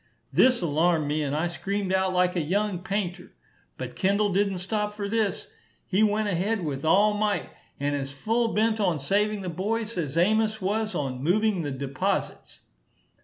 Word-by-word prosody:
This 255 -6 +4
alarmed 160 0 +2
me, 150 +1 0
and 145 -1 -1
I 155 +3 0
screamed 195 +2 -2
out 190 0 +2
like 180 0 +2
a 175 - +1
young 195 +4 0
painter. 190 -1 -4 0.4
But - - -6
Kendall 200 +1 +1
didn't 195 0 +1
stop 210 +3 -2
for 205 -1 -3
this. 215 -2 -1 0.4
He 195 +2 +1
went 215 0 +2
ahead 200 +1 0
with 140 -2 -3
all 200 +6 +4
might, 210 -3 -1 0.3
and 145 +1 0
as 135 -1 -3
full 225 +12 0
bent 220 +1 +2
on 180 -6 +2
saving 205 +8 0
the 185 - -5
boys, 215 +6 -2
as 150 -2 -3
Amos 215 +4 +2
was 215 +3 -1
on 130 -3 -3
moving 200 +4 +2
the 145 - -3
deposites. 135 0 -3
190 Hz, 170 wpm, -26 LUFS, 165-210 Hz, 0.4 s, This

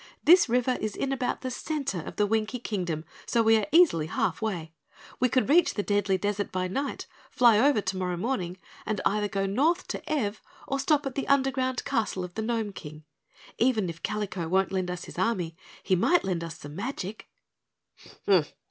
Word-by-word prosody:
"This 345 -4 +7
river 250 +1 +1
is 215 -1 -2
in 275 - -2
about 255 -2 -1
the 255 - -4
center 275 - -3
of - - -8
the 210 - +2
Winkie 220 +3 0
Kingdom, 175 -9 -3 0.2
so 230 - +2
we 225 0 +5
are 215 - -1
easily 300 - +5
half 175 - -1
way. 175 -7 -3 0.5
We 255 - +3
could 255 - +2
reach 320 +4 +4
the 205 - -1
Deadly 205 -2 +1
Desert 205 +1 -2
by 185 0 -1
night, 275 +10 -3 0.2
fly 235 -4 +5
over 275 -3 +4
tomorrow 185 -2 -2
morning, 185 -4 -2 0.3
and 215 -3 -2
either 210 0 +1
go 195 -1 -1
North 295 - +1
to - - -5
Ev 220 -9 -1 0.3
or 275 - -1
stop 290 +1 +2
at 270 - -3
the 275 - -3
underground 265 -2 +1
castle 220 -7 -1
of 180 0 -7
the 220 - -3
Gnome 220 -2 -2
King. 155 -3 -10 0.6
Even 220 -7 +2
if 170 0 -14
Kalico 195 -5 -3
won't 190 +2 +2
lend 185 -2 -1
us 180 0 -5
his - - -9
army, 185 -5 0 0.3
he 185 - +2
might 345 - +3
lend 180 -3 -2
us 165 -2 -7
some 145 -1 -10
magic." 215 -1 -5
210 Hz, 190 wpm, -27 LUFS, 185-255 Hz, 0.6 s, This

